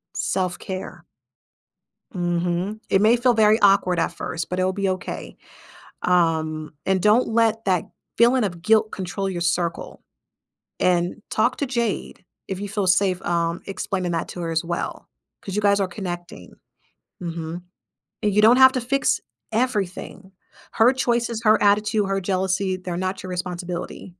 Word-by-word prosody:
Self-care. 185 0 -3 1.1
Mhm. 175 +3 -1
It 195 - +3
may 225 +3 +5
feel 245 0 +3
very 220 0 +4
awkward 195 -3 +4
at - - +1
first, 165 0 -5
but 180 +1 -2
it'll 185 0 +1
be 195 -1 -1
okay. 185 0 -5 0.7
Um, 160 -3 +1
and 190 -1 +1
don't 215 +4 +4
let 225 0 +1
that 185 -4 +1 0.3
feeling 240 0 +4
of 175 -3 -4
guilt 220 +2 +3
control 195 +1 -3
your 175 -2 -4
circle, 170 -1 -2 0.8
and 175 +2 +1
talk 240 +4 +1
to 285 - -1
Jade, 235 -4 -3 0.2
if 190 -1 -4
you 205 - -4
feel 205 -3 -1
safe, 185 0 +2
um, 170 0 -1
explaining 185 -2 -3
that 165 -1 -2
to 175 - -6
her 165 -1 -3
as 165 +1 0
well, 170 0 -4 0.3
'cause 195 0 -6
you 210 - +1
guys 200 -1 +3
are 195 - +1
connecting. 175 - -7 0.7
Mhm, 170 0 -5 0.6
and 210 -2 +1
you 210 - +5
don't 230 +3 +7
have 260 0 +8
to 255 - -1
fix 275 +3 +1 0.3
everything. 200 -4 -2 0.4
Her 230 +3 +5
choices, 235 -3 -1
her 215 0 +5
attitude, 210 0 +3
her 195 0 0
jealousy, 190 0 0
they're 180 -2 -5
not 185 +1 -3
your 185 - -7
responsibility. 180 -1 -5
190 Hz, 155 wpm, -23 LUFS, 175-215 Hz, 1.1 s, have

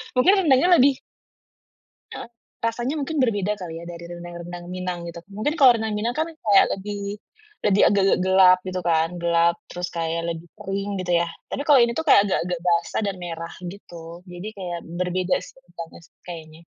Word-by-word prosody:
Mungkin 255 +10 +5
rendangnya 270 +5 +4
lebih 270 +1 +4 1.1
Heeh. - - -7 0.4
Rasanya 240 +5 -2
mungkin 305 +3 -3
berbeda 210 -4 +1
kali 175 -3 -6
ya 170 - -9
dari 170 0 -8
rendang-rendang 175 0 -8
Minang, 180 -1 -4
gitu. 170 0 -8
Mungkin 215 +10 -1
kalau 265 -4 +7
rendang 220 -1 -2
Minang 230 +3 -1
kan 320 +1 0 0.2
kayak 205 -2 +6
lebih, 200 +1 -5 0.5
lebih 205 -1 +3
agak-agak 195 -2 +2
gelap, 190 -1 +6
gitu 185 0 -3
kan? 165 -1 +2
Gelap, 170 0 +3 0.2
terus 180 0 -4
kayak 165 0 -1
lebih 165 0 -4 0.2
kering, 200 0 -3
gitu 180 -1 -2
ya. 170 - -1 0.2
Tapi 280 - -3
kalau 290 -3 +6
ini 235 0 +3
tuh, 320 - -2
kayak 275 - +7
agak-agak 180 -2 -1
basah 170 -1 +1
dan 195 - -3
merah, 165 -1 -6
gitu. 175 -2 -10
Jadi 180 +4 -7
kayak 175 -3 -5 0.2
berbeda 180 0 0
sih - - -13
rendangnya 170 -6 -10
sih. - - -25
Kayaknya. 160 -2 -9
185 Hz, 175 wpm, -23 LUFS, 170-210 Hz, 1.1 s, kalau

